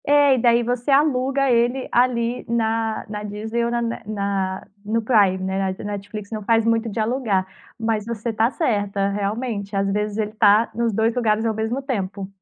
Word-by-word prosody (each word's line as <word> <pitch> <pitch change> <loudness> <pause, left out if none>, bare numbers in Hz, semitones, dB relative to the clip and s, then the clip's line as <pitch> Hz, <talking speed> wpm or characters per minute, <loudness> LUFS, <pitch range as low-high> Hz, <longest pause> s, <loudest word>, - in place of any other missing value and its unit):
É, 290 -1 +5
e - - +2
daí, 235 0 +4
você 245 +2 -2
aluga 275 -1 +3
ele 245 +2 +1
ali, 240 -1 +1
na 225 -1 0
na 210 0 -5
Disney, 220 +3 -3
ou - - 0
na 240 0 0
ne 230 0 -3
na 200 -2 -2 0.2
no 220 +2 0
Prime, 205 -5 +4
né, 190 0 -2
a - - -7
Netflix, 205 0 -6
não 215 -1 -4
faz 225 +1 +2
muito 230 0 +1
de 220 - -4
alugar, 220 -4 0 0.3
mas 225 -2 0
você 230 0 -3
tá 220 +2 +2
certa 205 - 0
realmente, 205 0 -3
às 195 0 +1
vezes, 210 +1 -1
ele 215 -1 -1
tá 215 +1 +4
nos 235 0 0
2 220 +2 +1
lugares, 220 -2 +1
ao 225 - +1
mesmo 220 +5 -2
tempo. 200 -7 -3
220 Hz, 190 wpm, -22 LUFS, 205-235 Hz, 0.3 s, É